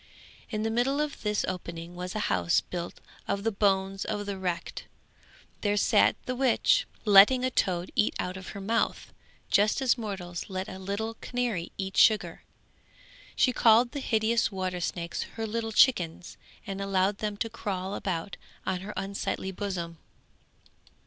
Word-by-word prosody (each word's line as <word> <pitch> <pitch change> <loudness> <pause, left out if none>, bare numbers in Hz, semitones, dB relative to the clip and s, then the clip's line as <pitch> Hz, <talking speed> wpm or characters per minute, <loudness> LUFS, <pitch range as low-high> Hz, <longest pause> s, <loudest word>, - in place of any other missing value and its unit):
In 215 -1 -2
the 225 - 0
middle 255 +5 +1
of 300 -1 -2
this 210 -1 0
opening 170 -1 -5
was 180 +2 -5
a 215 - -1
house 90 - +2
built 170 - -6 0.3
of 200 - -1
the 225 - +1
bones 195 -1 +1
of 205 -1 -3
the 200 -1 -3
wrecked; 180 -3 -4 0.8
there 205 -1 +1
sat - - +4
the 255 - -2
witch, 270 - +3 0.2
letting 210 +5 +7
a 255 - 0
toad 180 -6 0
eat 210 - +2
out 180 +1 -3
of 190 0 -8
her 200 - -7
mouth, 225 +4 -1 0.4
just 210 +5 +4
as 260 -2 +2
mortals 190 -6 -5
let 185 0 -3
a 190 - -8
little 200 +4 -3
canary 240 -9 -2
eat 190 0 -4
sugar. 215 -1 +4 0.9
She 255 - +3
called 235 +1 +5
the 290 - -4
hideous 225 -2 +1
water 185 -2 -3
snakes 170 0 -3 0.2
her 225 - -2
little 225 +1 -3
chickens, 180 -8 +3 0.3
and 195 0 -5
allowed 195 0 +1
them 210 -1 -3
to 225 - -1
crawl 195 -4 -4
about 185 -2 -3 0.3
on 185 -1 -1
her 200 +3 -7
unsightly 195 0 -3
bosom. 180 -4 -4
200 Hz, 160 wpm, -28 LUFS, 185-225 Hz, 0.9 s, letting